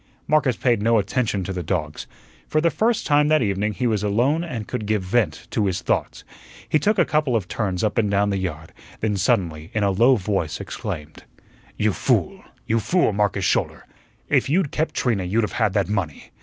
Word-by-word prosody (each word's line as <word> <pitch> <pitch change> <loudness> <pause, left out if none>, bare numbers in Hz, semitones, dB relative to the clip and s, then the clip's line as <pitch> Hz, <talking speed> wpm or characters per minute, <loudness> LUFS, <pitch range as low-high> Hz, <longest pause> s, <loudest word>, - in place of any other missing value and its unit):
Marcus 150 -5 +2
paid 120 -4 +1
no 115 +1 +3
attention 105 -1 0
to 95 - -4
the 90 - -3
dogs. 75 -3 -3 0.4
For 155 - +1
the 165 +1 +2
first 225 0 +1
time 145 -1 +3
that 155 -3 +3
evening 105 +1 -1
he 125 - -2
was 110 -4 +1
alone 120 +11 +1
and 120 -11 -5
could 105 - -4
give 105 -2 0
vent 115 +4 0
to 105 -3 +1
his 95 -1 -2
thoughts. - - -1 0.4
He 155 - +2
took 210 +8 +1
a 175 - +4
couple 150 -5 +1
of 100 -5 -1
turns 95 -4 -2
up 110 +2 +1
and 105 -2 +1
down 100 +1 +2
the 100 - -1
yard, 80 -4 -5 0.3
then 110 -2 0
suddenly 85 -5 0
in 110 - +1
a 100 - +3
low 120 +7 +5
voice 95 -7 -2
exclaimed: 75 +1 -6 0.5
"You - - +1
fool, - - 0 0.2
you 115 +1 +1
fool, 170 - +1
Marcus 100 -2 0
Schouler! - - 0 0.4
If - - +2
you'd 160 -1 +1
kept 155 +1 -2
Trina 115 -7 0
you'd 105 +6 0
have 105 - -2
had 100 - +2
that 100 -2 +1
money. 95 -8 -3
105 Hz, 205 wpm, -22 LUFS, 95-125 Hz, 0.5 s, low